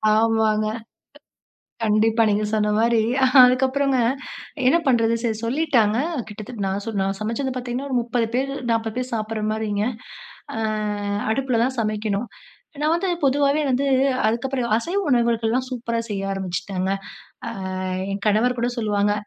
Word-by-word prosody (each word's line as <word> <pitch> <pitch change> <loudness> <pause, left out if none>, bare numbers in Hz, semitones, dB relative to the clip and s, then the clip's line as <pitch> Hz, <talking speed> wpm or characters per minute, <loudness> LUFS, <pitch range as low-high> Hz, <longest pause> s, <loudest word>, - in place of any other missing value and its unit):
ஆமாங்க. 220 -1 +2
க - - -18 1.0
கண்டிப்பா 220 +1 +3
நீங்க 210 +1 +1
சொன்ன 210 -1 +1
மாரி, 230 0 +3 0.4
அதுக்கப்புறங்க 260 +2 +3 0.7
என்ன 275 +6 +5
பண்றது, 230 -3 +3
சரி 225 -3 0
சொல்லிட்டாங்க. 240 -5 +2 0.3
கிட்டத்தட்ட 215 0 -6
நான் 195 +1 -2
சொன் 215 -3 -2
நான் 195 0 -2
சமச்சது 230 +5 -2
பார்த்தீங்கன்னா, 250 +2 -4
ஒரு 255 - +2
30 235 0 0
பேரு, 270 +2 0 0.2
40 225 -1 -1
பேரு 255 0 -3
சாப்பிடுற 215 -1 -3
மாரிங்க. 210 -1 -1 0.7
அ - - -2 0.7
அடுப்புல 255 -1 0
தான் 260 +1 -2
சமைக்கணும். 215 0 -1 0.5
நான் 305 +1 +2
வந்து 345 +3 0
பொதுவாவே 280 +2 +3
வந்து 265 +1 +1 0.4
அதுக்கப்புறம் 245 +3 -1
அ - - -5
அசைவ 340 - -1
உணவுகளுக்கெல்லாம் 235 -1 +2
சூப்பரா 235 -2 -2
செய்ய 200 -2 -3
ஆரம்பிச்சுட்டேங்க. 190 0 -3 0.6
அ, - - -4 0.6
என் 200 0 -4
கணவர் 225 +4 +3
கூட 235 +1 +1
சொல்லுவாங்க, 205 -2 +1
230 Hz, 135 wpm, -22 LUFS, 215-255 Hz, 1.0 s, என்ன